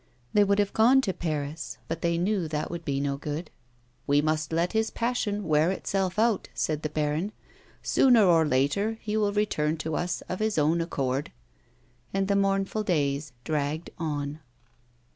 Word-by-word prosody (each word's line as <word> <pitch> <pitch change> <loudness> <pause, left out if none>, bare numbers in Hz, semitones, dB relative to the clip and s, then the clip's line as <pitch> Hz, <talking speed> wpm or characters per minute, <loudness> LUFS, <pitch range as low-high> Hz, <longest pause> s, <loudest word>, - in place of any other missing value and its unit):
They 205 - +6
would 200 0 +2
have 205 -1 +1
gone 250 +5 +5
to 195 -7 -1
Paris, 155 -1 -4
but 165 0 -4
they 170 0 +1
knew 185 -1 0
that 155 0 -3
would 170 -1 -5
be 140 -3 -1
no 140 0 -1
good. 150 +3 -5 0.3
" 120 +1 -38
We 145 +1 +4
must 155 +1 0
let 170 +4 0
his 220 0 +1
passion 215 -5 -1
wear 155 +1 +3
itself 190 0 -1
out," 225 -1 +2
said 155 -1 -1
the 155 - -2
baron; 155 +7 -1 0.3
*' - - -30
sooner 245 -6 +6
or 165 -3 +5
later 155 +11 +1
be 210 0 -1
will 210 -2 +2
return 165 -7 0
to 160 0 -3
us 175 0 -2
of 185 - -5
his 215 -3 0
own 155 +3 +3
accord." 135 -4 -2 0.8
And 195 0 +1
the 200 - +2
mournful 195 +1 +1
days 145 -6 0
dragged 155 +1 -2
on. 150 -2 -3
165 Hz, 180 wpm, -27 LUFS, 150-200 Hz, 0.8 s, They